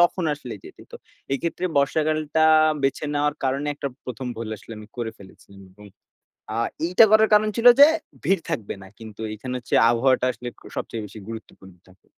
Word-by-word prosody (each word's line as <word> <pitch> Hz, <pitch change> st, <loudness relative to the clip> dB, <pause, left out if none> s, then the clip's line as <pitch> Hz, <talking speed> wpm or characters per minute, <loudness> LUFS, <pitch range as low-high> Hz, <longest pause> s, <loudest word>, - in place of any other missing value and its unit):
তখন 175 Hz, 0 st, +3 dB
আসলে 130 Hz, -5 st, -8 dB
যেতে -, -, -13 dB
তো। -, -, -9 dB, 0.4 s
এক্ষেত্রে 170 Hz, +5 st, -2 dB
বর্ষাকালটা 155 Hz, +2 st, +1 dB, 0.4 s
বেছে 135 Hz, +2 st, 0 dB
নেওয়ার 145 Hz, 0 st, +1 dB
কারন 135 Hz, +2 st, 0 dB
একটা 140 Hz, -, -4 dB, 0.2 s
১ম 125 Hz, +1 st, -6 dB
ভুল 115 Hz, -1 st, -5 dB
আসলে 115 Hz, -, -12 dB
আমি 105 Hz, -, -11 dB
করে 115 Hz, -2 st, -3 dB
ফেলেছিলাম। 100 Hz, 0 st, -16 dB
এবং 105 Hz, +2 st, -15 dB, 0.6 s
অ্যা -, -, -3 dB, 0.3 s
এইটা 180 Hz, +6 st, +6 dB
করার 220 Hz, 0 st, +6 dB
কারন 215 Hz, +1 st, +4 dB
ছিল 230 Hz, -, 0 dB
যে, 285 Hz, -, +12 dB, 0.4 s
ভিড় 195 Hz, -2 st, +2 dB
থাকবে 125 Hz, -11 st, -3 dB
না। -, -, -11 dB
কিন্তু 110 Hz, -1 st, -11 dB
এখানে 125 Hz, +4 st, -6 dB
হচ্ছে 125 Hz, -, -5 dB, 0.2 s
আবহাওয়াটা 130 Hz, +2 st, +2 dB
আসলে 125 Hz, -, -8 dB
ক -, -, -21 dB, 0.2 s
সবচেয়ে 110 Hz, -2 st, -4 dB
বেশি 110 Hz, -, -12 dB
গুরুত্বপূর্ণ 100 Hz, -4 st, -10 dB
থাকে। 95 Hz, +1 st, -24 dB
130 Hz, 175 wpm, -23 LUFS, 110-155 Hz, 0.6 s, যে